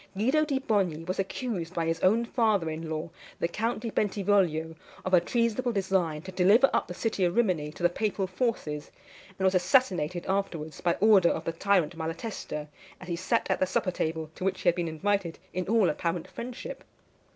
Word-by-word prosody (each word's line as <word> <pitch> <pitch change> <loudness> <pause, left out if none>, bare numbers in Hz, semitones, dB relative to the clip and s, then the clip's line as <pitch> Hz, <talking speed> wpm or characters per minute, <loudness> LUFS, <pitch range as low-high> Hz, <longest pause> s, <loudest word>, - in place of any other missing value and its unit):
Guido 265 +9 +3
di 285 -3 0
Bogni 195 - 0
was 185 +2 -3
accused 190 -3 -3
by 165 - 0
his 165 0 -1
own 220 +7 +3
father 215 -9 +1
in 160 +1 -5
law, 160 +1 -4 0.3
the - - +1
Count 220 +5 -2
di 230 -1 -4
Bentivoglio, 190 -7 +1 0.3
of 185 - -2
a 180 - +7
treasonable 235 +4 0
design 190 -7 0
to 190 - -7
deliver 200 +9 +5
up - - +1
the 180 - -7
city 215 -3 -1
of 175 +1 +1
Rimini 180 -10 +1
to 175 - -10
the - - +7
papal 195 +2 -1
forces, 185 -7 -2 0.5
and 190 - 0
was 190 - +4
assassinated 180 - +2
afterwards, 175 -6 -2
by 170 -1 +2
order 200 -5 +6
of 160 - -2
the - - 0
tyrant 175 -2 +1
Malatesta, 165 -2 -5 0.3
as 185 - -10
he 170 - 0
sat 185 +6 0
at - - +1
the 185 - +2
supper 185 0 0
table, 160 -2 -3
to - - -8
which 190 0 -1
he 180 - +4
had 175 - +1
been 175 -2 -1
invited 175 +2 -1 0.2
in 180 -1 -2
all 220 -2 +4
apparent 170 -1 -2
friendship. 255 - -7
185 Hz, 195 wpm, -28 LUFS, 165-215 Hz, 0.5 s, a